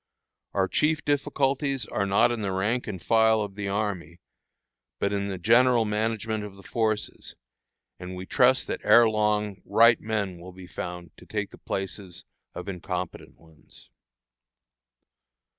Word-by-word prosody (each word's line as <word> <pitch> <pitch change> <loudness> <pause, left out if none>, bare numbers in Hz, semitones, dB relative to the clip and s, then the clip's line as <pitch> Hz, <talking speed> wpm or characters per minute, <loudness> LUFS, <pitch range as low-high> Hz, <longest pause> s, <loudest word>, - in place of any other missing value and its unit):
Our 95 -1 +2
chief 155 +8 +1
difficulties 140 -2 0
are 100 -1 -2
not 100 +5 +4
in 120 -2 -3
the 100 -2 -1
rank 105 +7 -1
and 100 -4 -5
file 110 +3 +3
of 100 -1 -6
the 100 0 -4
army, 100 -4 -3 0.8
but 100 - -1
in 100 0 -1
the 95 -2 -4
general 120 +4 +4
management 110 0 -1
of 105 -2 -8
the 100 - -15
forces, 110 +1 -2 0.6
and 90 0 -7
we 90 +1 -7
trust 130 +5 +3
that - - -4
ere 115 +2 +7
long 105 -2 0
right 115 0 +5
men 100 -5 -2
will 90 +2 -11
be 95 0 -11
found 90 -2 -7
to - - -16
take - - -3
the - - -14
places 95 -1 -5 0.3
of 90 - -7
incompetent 90 -3 -5
ones. 80 -1 -18
105 Hz, 150 wpm, -26 LUFS, 95-115 Hz, 0.8 s, ere